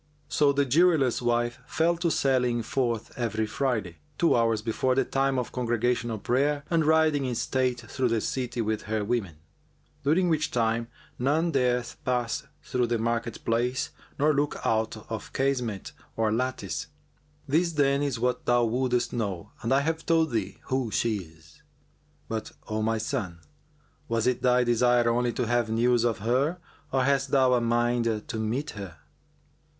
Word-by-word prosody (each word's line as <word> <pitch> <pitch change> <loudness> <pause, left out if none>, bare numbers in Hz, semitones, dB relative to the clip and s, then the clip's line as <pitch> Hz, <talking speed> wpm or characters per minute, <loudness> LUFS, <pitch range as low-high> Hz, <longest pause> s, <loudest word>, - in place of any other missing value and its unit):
So 145 -1 +3
the 140 0 +2
jeweller's 145 -3 +3
wife 120 0 0
fell 165 +2 +2
to 170 0 0
sallying 125 -5 +1
forth 120 -2 -1
every 110 -2 -1
Friday, 110 -7 -2 0.2
two 170 - +3
hours 115 -2 +2
before 125 +3 0
the 135 -1 +2
time 135 0 +1
of 125 - -2
congregational 120 -1 0
prayer, 140 +7 0
and 165 -1 +3
riding 155 -2 +3
in 125 -2 -2
state 125 0 0
through 125 +3 -1
the 115 -1 +1
city 125 +1 -2
with 110 -1 -1
her 110 -1 0
women; 100 -8 -1 0.7
during 165 +6 +3
which 155 -2 +1
time 115 -1 0 0.3
none 155 +7 +1
dareth 125 -3 0
pass 120 -2 -1 0.2
through 125 -1 0
the 120 0 0
market 115 0 -2
place 120 +3 0 0.3
nor 150 +2 +3
look 145 +1 0
out 110 0 +1
of 110 - -5
casement 125 -7 -1 0.3
or 110 -1 +2
lattice. 130 +3 -2 0.6
This, 165 +4 +2
then, 140 -2 +2
is 140 -4 -1
what 125 +1 -1
thou 120 0 +4
wouldest 125 +1 0
know 100 -7 -3
and 115 - -2
I 135 +1 +4
have 160 +2 -2
told 165 -2 +3
thee 100 -4 -2
who 130 -3 -1
she 110 0 0
is; 85 - -13 0.7
but, 110 -1 -4 0.2
O 110 0 -2
my 110 +1 +1
son, 95 -5 -3 0.7
was 115 -1 0
it 125 -1 +1
thy 125 0 +4
desire 120 0 +3
only 120 +1 +2
to 125 - -1
have 120 0 +1
news 120 +1 +2
of 120 -2 +1
her 135 +9 +1 0.3
or 130 -1 +2
hast 140 0 +1
thou 130 -2 +4
a 125 - +3
mind 120 -2 +1
to 110 - -4
meet 120 +7 -2
her?" 95 -6 -8
120 Hz, 165 wpm, -27 LUFS, 115-135 Hz, 0.7 s, thou